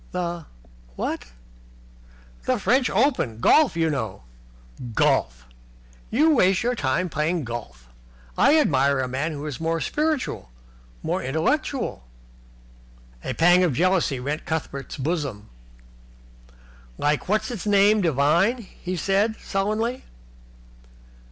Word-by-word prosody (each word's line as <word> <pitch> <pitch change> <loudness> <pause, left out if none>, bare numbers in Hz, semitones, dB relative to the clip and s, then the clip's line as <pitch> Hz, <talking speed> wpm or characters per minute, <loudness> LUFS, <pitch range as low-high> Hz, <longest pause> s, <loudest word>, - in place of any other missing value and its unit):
"The 175 -2 -3 0.5
what?" - - -3 1.2
"The - - +1
French 250 +5 +2
Open 205 - +1
Championship. - - -11
Golf, 305 - +5
you 165 -1 +2
know." 110 - -4 0.7
"Golf! - - +1 0.6
You 305 +8 +3
waste 190 -4 +3
all - - +3
your 250 - 0
time 145 - 0
playing 160 +2 -1
golf. 115 - -7 0.5
I 310 - +5
admire 140 - +2
a 130 - -1
man 135 +6 -2
who 150 -1 -6
is 145 -4 -5
more 165 0 0
spiritual, 300 - -2 0.5
more - - -1
intellectual." 160 - -1 1.2
A - - -3
pang 175 +2 +5
of 170 -6 +2
jealousy 170 -3 +1
rent 145 +5 -3
Cuthbert's 150 -4 -4
bosom. 140 -8 -3 1.5
"Like 150 +4 0
What's 215 +1 +1
his 220 -4 -5
name 205 +1 +4
Devine?" 170 - +2
he 185 -1 -7
said, 200 +5 +1
sullenly. 215 +5 -2
170 Hz, 120 wpm, -24 LUFS, 140-215 Hz, 1.5 s, Golf